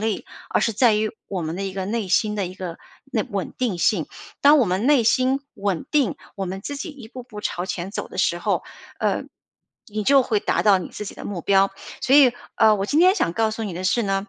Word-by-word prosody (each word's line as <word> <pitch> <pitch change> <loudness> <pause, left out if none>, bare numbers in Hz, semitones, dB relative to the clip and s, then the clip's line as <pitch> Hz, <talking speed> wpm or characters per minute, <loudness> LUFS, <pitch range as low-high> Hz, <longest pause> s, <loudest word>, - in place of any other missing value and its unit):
力， 220 -2 -2 0.2
而 - - +1
是 225 - +1
在 225 +1 +4
于 215 0 0 0.2
我 190 -3 -3
们 160 +2 -4
的 195 - -3
一 195 - -4
个 190 0 -3
内 220 -1 -2
心 210 +3 +2
的 200 -3 -1
一 180 - -8
个， 180 -3 -6 0.3
内 215 -4 +1
稳 200 -2 -3
定 240 -8 0
性。 170 -2 +2 0.3
当 290 +2 +7
我 260 - +4
们 190 +5 0
内 285 -4 +5
心 255 +4 +2
稳 195 -4 -2
定， 275 - +2 0.2
我 195 - -2
们 190 +2 -5
自 285 - -5
己 290 +5 -5
一 265 -7 -12
步 250 +1 -9
步 210 -4 -9
朝 180 -3 -3
前 185 0 -4
走 - - -4
的 - - -10
时 - - +2
候， - - 0 0.4
呃， - - 0 0.6
你 210 0 -3
就 275 +3 +6
会 220 -4 +1
达 - - 0
到 200 -3 +5
你 180 - -6
自 210 - -7
己 205 - -7
的 - - -10
目 195 -4 -4
标。 195 +3 +3 0.3
所 265 - +3
以， 275 -4 +7 0.2
呃， 215 -1 +5
我 195 0 -2
今 300 +7 +2
天 370 +2 +6
想 170 - +1
告 220 +3 +1
诉 225 +1 -4
你 200 - -4
的 180 - -5
是 185 +6 +2
呢， 195 0 -1
210 Hz, 270 characters per minute, -23 LUFS, 190-245 Hz, 0.6 s, 当